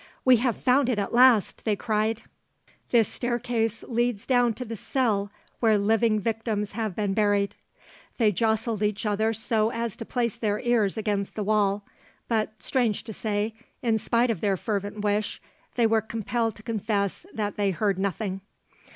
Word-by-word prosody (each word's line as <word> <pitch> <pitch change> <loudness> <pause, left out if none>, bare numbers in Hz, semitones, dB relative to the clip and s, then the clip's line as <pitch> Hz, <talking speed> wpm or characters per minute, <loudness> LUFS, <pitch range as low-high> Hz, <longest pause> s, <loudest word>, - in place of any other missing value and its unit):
'We 255 -1 +7
have 240 -1 0
found 255 +1 +3
it 240 - +1
at 200 +1 -2
last!' 245 -4 +5
they 215 -2 +1
cried; 220 +1 -1 0.7
'this 230 -4 +4
staircase 235 -2 -2
leads 240 -2 0
down 245 -3 +3
to 250 - -5
the 225 0 -5
cell 215 -3 0 0.3
where 220 -3 +4
living 215 +1 +2
victims 215 -1 -2
have 215 -3 -3
been 205 -2 0
buried.' 205 -1 +1 0.6
They 220 -4 +4
jostled 220 +1 0
each 210 0 0
other 215 +1 +1
so 220 0 +1
as 230 -2 -3
to - - -5
place 235 -1 -1
their 210 -2 0
ears 235 -5 +1
against 205 -2 -2
the 215 - -2
wall, 205 -1 +1 0.4
but 215 -3 -1
strange 240 -6 0
to 220 - -7
say, 210 +1 -2 0.3
in 225 -2 +2
spite 235 +2 +2
of 205 - -4
their 200 -2 +1
fervent 205 0 -3
wish, 210 0 0 0.4
they 240 - +3
were 225 0 +3
compelled 225 +1 -2
to 210 - -12
confess 215 - -2
that 205 -2 -3
they 205 -1 +1
heard 195 0 0
nothing. 195 0 -2
220 Hz, 170 wpm, -26 LUFS, 205-230 Hz, 0.7 s, We